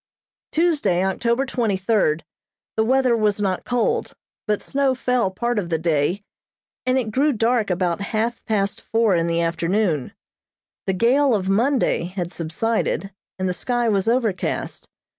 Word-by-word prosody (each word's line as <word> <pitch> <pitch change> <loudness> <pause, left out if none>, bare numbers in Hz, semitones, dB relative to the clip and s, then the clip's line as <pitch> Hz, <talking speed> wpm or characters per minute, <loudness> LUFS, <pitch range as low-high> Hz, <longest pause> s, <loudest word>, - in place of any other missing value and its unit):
Tuesday, 305 - +2
October 235 +7 0
twenty 230 -7 0
third, 185 -6 +1 0.5
the 220 - +2
weather 255 +1 +3
was 210 -2 +1
not 190 -3 -1
cold, 245 -2 0 0.3
but 210 -1 +1
snow 275 -1 0
fell 250 -4 +1
part 235 +4 -1
of 175 -4 -4
the 165 - +1
day, 165 +4 0 0.6
and 255 +1 +3
it 230 -4 -1
grew 280 +6 +2
dark 230 -2 +1
about 180 -1 0
half 225 +3 -2
past 200 -2 -1
four 225 -3 +2
in 170 -1 +1
the 170 0 +1
afternoon. 170 -2 0 0.7
The 190 - +2
gale 250 +6 +3
of 190 -2 -1
Monday 240 -1 +2
had 180 -1 -4
subsided, 195 +4 -1 0.3
and 185 0 -1
the 180 - 0
sky 240 +5 -1
was 200 -1 +1
overcast. 230 -5 -1
210 Hz, 150 wpm, -22 LUFS, 185-240 Hz, 0.7 s, weather